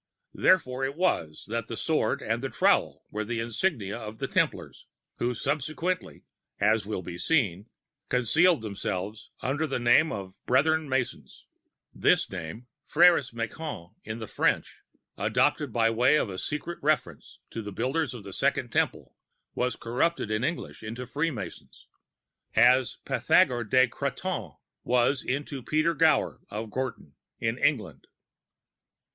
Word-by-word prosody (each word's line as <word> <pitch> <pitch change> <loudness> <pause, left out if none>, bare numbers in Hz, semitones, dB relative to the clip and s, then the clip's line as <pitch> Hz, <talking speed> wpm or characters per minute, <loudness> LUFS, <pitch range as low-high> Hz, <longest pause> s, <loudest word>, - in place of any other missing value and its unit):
Therefore 135 -8 +3
it 135 +1 -1
was 120 - 0
that 115 +2 -3
the - - -5
Sword - - 0
and - - -1
the - - -2
Trowel - - +2
were 105 +1 -2
the 115 +2 -3
insignia 115 - -1
of 110 -1 -7
the - - -3
Templars, - - -1 0.3
who 120 +1 0
subsequently, 155 +7 -2 0.4
as 105 0 +2
will 105 -4 -3
be 85 +1 -7
seen, 105 - +1 0.4
concealed 155 +5 +3
themselves 100 0 -4
under 145 +5 0
the 135 - -1
name 120 +6 +4
of 95 -1 -7
Brethren 155 +4 +3
Masons. 130 -2 -3 0.5
[This - - +3
name, 95 +6 -6 0.2
Fr├©res 170 -4 +5
Ma├¦ons 115 - -5
in 110 +1 -5
the 110 - -5
French, - - 0 0.4
adopted 125 +6 +1
by 115 0 +3
way 125 +6 +4
of 95 -10 -2
secret 170 +3 -4
reference 155 +1 -1
to 115 - -4
the 105 -1 -6
Builders 130 +6 -1
of 115 - -9
the 100 -1 -9
Second - - 0
Temple, - - -1 0.4
was 125 0 0
corrupted 125 +1 -1
in 110 +2 0
English 165 +4 -3
into 115 +4 -6
Free 145 +6 -1
Masons, 100 - -8 0.7
as 125 +3 +5
Pythagore 120 -2 +3
de 130 +2 +5
Crotone 140 +9 -4 0.3
was 125 +2 +2
into 140 +1 -3
Peter 155 +6 +1
Gower 160 0 +2
of 110 +1 -5
Groton 125 - -4 0.3
in 115 +2 -1
England. 105 - 0
125 Hz, 140 wpm, -28 LUFS, 110-150 Hz, 0.7 s, Fr├©res